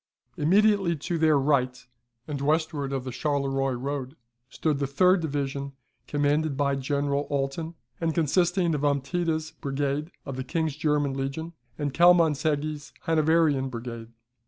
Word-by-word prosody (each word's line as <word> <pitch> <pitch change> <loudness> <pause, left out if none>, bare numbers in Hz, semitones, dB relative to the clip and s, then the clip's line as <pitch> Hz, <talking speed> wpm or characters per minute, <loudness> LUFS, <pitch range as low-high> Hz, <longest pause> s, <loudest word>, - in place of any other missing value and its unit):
Immediately 195 +2 +3
to 165 +3 -3
their 155 -2 +4
right, 130 -3 +1 0.4
and 145 -3 -4
westward 150 -1 0
of 135 -2 -2
the 130 - -5
Charleroi 135 0 0
road, 135 +2 -4 0.3
stood 150 0 -1
the 140 - 0
third 180 +6 +4
division, 140 -2 -3 0.3
commanded 145 0 +1
by 140 -1 +1
General 140 +1 -1
Alten, 145 +4 -2 0.2
and 165 -1 -1
consisting 175 +2 +2
of 145 - -1
Ompteda's 155 +3 0
brigade 140 +2 -2 0.2
of 135 -2 -5
the 130 - -3
King's 160 0 -1
German 150 -2 +1
legion, 140 +5 -4 0.2
and 145 -2 -2
Kielmansegge's 155 -3 +3
Hanoverian 160 -4 +2
brigade. 115 -2 -6
145 Hz, 135 wpm, -26 LUFS, 135-160 Hz, 0.4 s, their